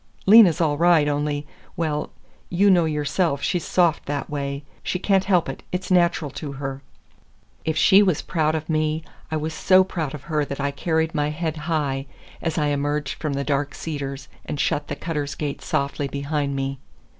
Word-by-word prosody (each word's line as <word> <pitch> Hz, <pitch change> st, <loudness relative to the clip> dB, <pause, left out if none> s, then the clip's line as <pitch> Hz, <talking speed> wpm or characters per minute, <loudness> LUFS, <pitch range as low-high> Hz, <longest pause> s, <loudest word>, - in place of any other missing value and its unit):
Lena's 195 Hz, -5 st, +8 dB
all 150 Hz, -3 st, +1 dB
right, 170 Hz, -3 st, +5 dB
only—well, 150 Hz, +1 st, -3 dB, 0.4 s
you 195 Hz, +3 st, +4 dB
know 175 Hz, -3 st, +4 dB
yourself 150 Hz, 0 st, 0 dB
she's 175 Hz, -, 0 dB
soft 175 Hz, -4 st, +2 dB
that 145 Hz, 0 st, -3 dB
way. 140 Hz, -1 st, -3 dB, 0.2 s
She -, -, -2 dB
can't 190 Hz, +1 st, +2 dB
help 185 Hz, -4 st, +3 dB
it. -, -, -6 dB
It's 185 Hz, +1 st, -3 dB
natural 170 Hz, -5 st, +3 dB
to 145 Hz, -3 st, -6 dB
her." 135 Hz, 0 st, -5 dB, 0.8 s
If 160 Hz, -1 st, 0 dB
she 195 Hz, +5 st, +6 dB
was 185 Hz, -7 st, +2 dB
proud 155 Hz, -2 st, 0 dB
of 155 Hz, 0 st, -4 dB
me, 155 Hz, 0 st, 0 dB, 0.3 s
I 155 Hz, -, -1 dB
was 155 Hz, +1 st, -3 dB
so 185 Hz, +4 st, +5 dB
proud 160 Hz, -6 st, -4 dB
of 145 Hz, -, -10 dB
her 155 Hz, -2 st, 0 dB
that 140 Hz, 0 st, -5 dB
I 140 Hz, 0 st, 0 dB
carried 160 Hz, +2 st, 0 dB
my 150 Hz, -2 st, 0 dB
head 160 Hz, +1 st, -3 dB
high 140 Hz, -4 st, -1 dB, 0.3 s
as 165 Hz, -2 st, -2 dB
I 150 Hz, -2 st, +2 dB
emerged 145 Hz, +1 st, -1 dB
from 150 Hz, -3 st, -1 dB
the 140 Hz, 0 st, -1 dB
dark 140 Hz, -1 st, -1 dB
cedars 140 Hz, -3 st, -5 dB, 0.2 s
and 145 Hz, -, -5 dB
shut 145 Hz, +1 st, 0 dB
the 145 Hz, -, -3 dB
Cutters' 150 Hz, -2 st, -3 dB
gate 145 Hz, -2 st, -4 dB
softly 140 Hz, 0 st, -1 dB
behind 140 Hz, 0 st, -2 dB
me. 135 Hz, 0 st, -3 dB
150 Hz, 180 wpm, -23 LUFS, 145-165 Hz, 0.8 s, Lena's